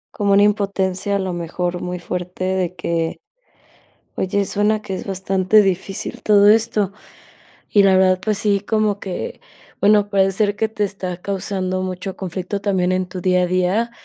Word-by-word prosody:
Como 200 -2 +1
una 200 +1 +6
impotencia 200 -1 0
a 200 - 0
lo 185 -2 -2
mejor 175 +1 -3
muy 180 0 -4
fuerte 180 +1 -5
de 185 -1 -1
que 165 -2 -2 1.0
oye, 200 +2 0
suena 210 +2 0
que 190 - -5
es - - -6
bastante 190 +2 +2
difícil 190 0 -2
todo 205 -1 +5
esto 215 -3 +2 0.8
y 205 - +5
la 190 -1 +5
verdad, 185 0 +3
pues 215 -1 0
sí, 200 -2 +1
como 210 -1 0
que, 185 -2 -5 0.4
bueno, 205 0 +4
puede 195 -1 +3
ser 205 +1 0
que 220 +1 0
te 215 -1 -2
está 190 -2 -4
causando 190 -1 -2
mucho 185 +1 -5
conflicto, 190 +2 -4
también 185 -3 +1
en 185 0 0
tu 180 0 -6
día 180 -1 +3
a - - +2
día, 185 +6 +1
190 Hz, 170 wpm, -20 LUFS, 185-205 Hz, 1.0 s, una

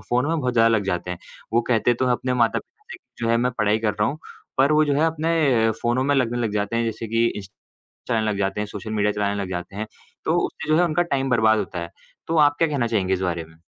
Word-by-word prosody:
Phone 125 +3 +1
में 165 0 0
बहुत 125 -1 -1
ज़्यादा 115 -1 +4
लग 110 -3 +1
जाते 90 -1 -2
हैं। 90 - -5 0.3
वो 120 - +4
कहते 120 0 +3
तो 130 - -1
हैं 125 - +3
अपने 125 +1 -1
माता-पिता 125 - -1
से - - -7
कि - - -17
जो - - +1
है 115 - +4
मैं 125 +2 +1
पढ़ाई 105 0 +2
कर 110 -2 0
रहा 105 0 +1
हूँ, 150 +3 -5 0.4
पर 140 +3 +4
वो 155 0 +4
जो 145 -1 +1
है 155 +3 +2
अपने 155 -8 +2
फ़ोनों 120 +2 +1
में 145 - +2
लगने 120 -3 +1
लग 115 -3 -1
जाते 105 +2 -1
हैं। 115 - +1
जैसे 115 0 -4
कि 115 +1 +2
इंस 100 -4 -4 0.6
चलाने 110 -3 +1
लग 100 - -3
जाते 100 +1 -1
हैं, 105 - -2
सोशल 105 +2 -7
मीडिया 105 -1 +1
चलाने 100 0 -1
लग 95 - -6
जाते 90 +2 -5
हैं, 110 - -3 0.4
तो - - +1
उससे - - -9
जो 155 - +4
है 175 - +4
उनका 175 +1 +1
टाइम 135 -1 0
बर्बाद 110 -2 +4
होता 90 - -4
है। 85 0 -6 0.4
तो 165 - -1
आप 145 - -8
क्या 165 - +3
कहना 140 -5 0
चाहेंगे 100 -5 +1
इस 95 - -3
बारे 85 -3 -2
में? 80 +1 -21
115 Hz, 275 wpm, -23 LUFS, 105-130 Hz, 0.6 s, ज़्यादा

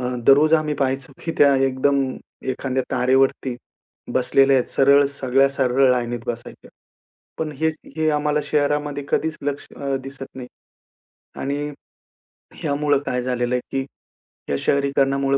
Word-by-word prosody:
अ, 125 0 -2
दररोज 150 +3 +6
आम्ही 155 -2 +1
पाहायचो, 135 0 -2
की 165 - -2
त्या 140 -1 +6
एकदम 135 +1 +1 0.5
एखाद्या 130 0 -2
तारेवरती 130 0 +2 0.6
बसलेल्या 135 0 +4
आहेत. 125 - 0
सरळ 140 +1 +5
सगळ्या, 135 -1 +2
सरळ 130 -1 +3
लाईनीत 120 -1 -1
बसायच्या. 120 0 -7 0.7
पण 155 -1 -3
हेच 160 +1 0 0.2
हे 160 0 +1
आम्हाला 150 0 +1
शहरामध्ये 145 -1 0
कधीच 160 0 0
लक्ष 145 0 -3
अ, 140 -1 -2
दिसत 135 0 -8
नाही 125 -2 -7 0.9
आणि 140 +1 -2 1.0
ह्यामुळे 145 -1 +1
काय 125 - -1
झालेलं 125 0 -1
आहे, 125 - -1
की 135 0 -1 0.7
या 70 - +2
शहरीकरणामुळे 140 -1 +1
135 Hz, 135 wpm, -22 LUFS, 130-145 Hz, 1.0 s, दररोज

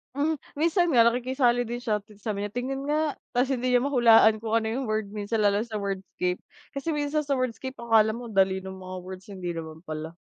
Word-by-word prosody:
Hmm, 300 +1 0 0.2
minsan 335 +4 +2
nga 230 - +8
nakikisali 245 0 +2
din 240 +1 -5
siya 215 -3 +1
ta's 210 0 -20
sabi 210 -3 -2
niya, 205 - -2
"Tingin 270 +3 -3
nga," 305 0 0 0.2
ta's 255 +2 +2
hindi 255 -1 -1
niya 250 0 +3
mahulaan 230 -5 +5
kung 225 0 -1
ano 220 -1 +1
yung 255 +1 -2
word 215 -2 -2
minsan 210 +1 -1
lalo 205 0 +3
sa 225 -1 -5
wordscape, 195 -3 -2 0.3
kasi 300 +3 -3
minsan 290 +1 0
sa 285 -2 0
wordscape 255 +1 -3
akala 225 -2 +3
mo 235 -1 -7
dali 190 -1 +2
nung 190 0 -8
mga 185 -1 -7
words, 185 0 -9
hindi 185 -4 -5
naman 160 -1 -7
pala. 155 -1 -5
225 Hz, 210 wpm, -26 LUFS, 200-260 Hz, 0.3 s, nga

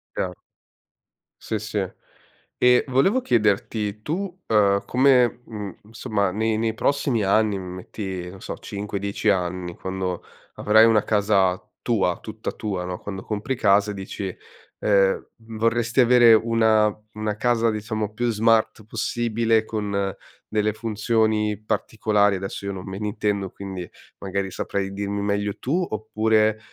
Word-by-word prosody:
Chiaro. 90 -1 -2 1.1
Sì, 110 - -3
sì. 110 0 -3 0.8
E 125 0 +5
volevo 140 - +3
chiederti, 105 - 0
tu, 180 - -4
uhm, 100 -2 +3
come, 125 -2 +3
mhmm, 105 -4 -6
insomma 105 -2 -2
nei 110 +2 0
nei 110 0 0
prossimi 130 -2 0
anni, 105 0 +2
metti 90 0 -6
non 95 +1 -12
so - - -6
5-10 100 +1 -3
anni, 90 -2 -1
quando 95 -1 -4 0.3
avrai 110 +1 +5
una 110 -2 +4
casa 100 -3 +2 0.2
tua, 95 -6 +1
tutta 110 0 -5
tua, 95 -5 -3
no, 90 0 -4
quando 95 0 -6
compri 110 +5 -3
casa 105 -2 +3
e - - -5
dici, 95 -1 -5 0.4
ehm 100 -2 +2 0.2
vorresti 115 +2 0
avere 120 -2 +7
una 110 -1 +4 0.3
una 105 0 -2
casa 115 +1 +2
diciamo 110 -1 -3
più 120 +2 0
smart 110 -1 +2
possibile, 115 0 0
con 100 -3 -2 0.3
delle 105 0 0
funzioni 110 -1 0
particolari, 105 -2 +1
adesso 95 +1 -6
io 100 - -2
non 95 -2 -7
me 95 - -5
ne 105 +1 -3
intendo, 100 -2 -1
quindi 95 -3 -7 0.3
magari 100 0 -2
saprai 95 +1 -3
dirmi 100 +1 -3
meglio 100 0 -1
tu, 175 +8 0
oppure, 110 0 +1
105 Hz, 135 wpm, -23 LUFS, 100-115 Hz, 1.1 s, avere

